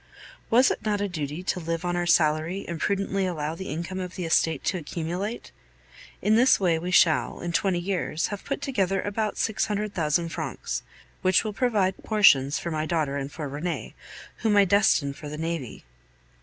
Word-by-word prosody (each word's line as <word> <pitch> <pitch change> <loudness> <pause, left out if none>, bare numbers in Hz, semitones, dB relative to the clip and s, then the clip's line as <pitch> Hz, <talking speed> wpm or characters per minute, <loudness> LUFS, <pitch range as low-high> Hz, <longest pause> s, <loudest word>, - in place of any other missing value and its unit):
Was 250 +3 +5
it - - -4
not 210 -1 0
a 205 - 0
duty 155 -1 -4
to 185 - -1
live 165 +1 -3
on 175 0 0
our 175 0 -1
salary 160 +3 +2
and 170 -2 -4
prudently 195 -1 0
allow 155 -3 -3
the 190 +3 -7
income 170 +4 -4
of 180 -1 -5
the 180 - -4
estate 160 -2 +2
to 185 - 0
accumulate? 175 +7 -4 0.7
In 210 +3 +4
this 250 +3 +5
way 170 -4 +2
we 175 +2 -4
shall, 170 -3 +3
in 175 - -3
twenty 185 +2 +1
years, 175 -3 -1
have 205 -1 -6
put 275 - -4
together 195 -8 0
about 210 +1 -2
six 220 -1 0
hundred 210 0 -2
thousand 165 +1 0
francs, - - -4 0.4
which 185 -1 +3
will 215 -2 -3
provide 200 -4 0
portions 160 -9 +4
for 170 - -4
my 155 0 -2
daughter 155 -5 0
and 140 0 -4
for 150 -1 -5
Rene, 150 +5 -4 0.4
whom 215 -2 +2
I 200 - +7
destine 185 -7 +3
for 150 +1 -9
the 150 - -6
navy. 160 - -4
175 Hz, 190 wpm, -26 LUFS, 160-200 Hz, 0.7 s, I